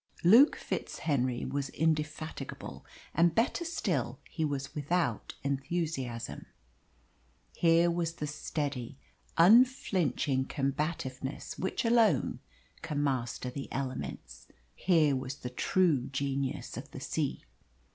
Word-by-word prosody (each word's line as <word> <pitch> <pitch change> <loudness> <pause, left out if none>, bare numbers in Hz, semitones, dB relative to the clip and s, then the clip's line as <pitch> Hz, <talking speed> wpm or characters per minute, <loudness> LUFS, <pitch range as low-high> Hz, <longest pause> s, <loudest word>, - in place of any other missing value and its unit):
Luke 230 - +8
FitzHenry 130 -5 -2
was 140 +1 -2
indefatigable, 155 0 -2 0.3
and, 170 0 +3
better 240 +9 +1
still, 335 0 -1
he 160 - -2
was 140 -2 -2
without 150 - -1
enthusiasm. 140 -3 -3 1.1
Here 170 0 +4
was 170 -1 -1
the 150 - -4
steady, 145 -4 -3 0.4
unflinching 175 - +4
combativeness 135 -1 -3
which 190 +5 -1
alone 230 -1 +3 0.4
can 145 -2 -2
master 125 -2 -1
the 135 +2 -6
elements. 130 - -5 0.3
Here 160 -6 +3
was 130 +1 -4
the 125 -3 -7
true 150 -1 +2
genius 135 0 -2
of - - -7
the - - -8
sea. - - -2
145 Hz, 105 wpm, -31 LUFS, 135-170 Hz, 1.1 s, Luke